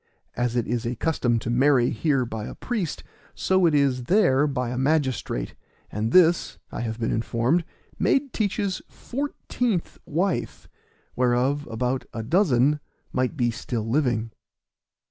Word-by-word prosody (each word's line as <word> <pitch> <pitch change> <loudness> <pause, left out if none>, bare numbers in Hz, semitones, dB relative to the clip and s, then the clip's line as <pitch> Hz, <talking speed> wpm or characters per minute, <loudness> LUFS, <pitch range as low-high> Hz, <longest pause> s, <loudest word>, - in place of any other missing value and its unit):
As 120 -1 -1
it 120 - +1
is 120 0 -1
a 120 +1 -2
custom 120 -4 +1
to 115 +1 -3
marry 125 0 +4
here 140 -6 +1
by 110 -2 -5
a - - -8
priest, 215 -10 -3 0.3
so 190 -2 +3
it 155 - +2
is 135 -4 +2
there 150 - +4
by 125 -4 -2
a 125 - -3
magistrate; 130 - 0 0.4
and 110 +2 -2
this, 175 0 +4
I - - -4
have 115 -1 -3
been 115 - 0
informed, 120 +8 +1 0.4
made 275 -1 +2
Teach's 200 -3 -1
fourteenth 245 - -3
wife 180 +5 -1 0.5
whereof 125 +4 +1
about 125 +3 -1
a 115 - -3
dozen 150 - +3 0.3
might 130 +4 0
be 120 -3 +2
still 115 -1 -4
living. 120 -4 0
130 Hz, 145 wpm, -25 LUFS, 120-165 Hz, 0.5 s, marry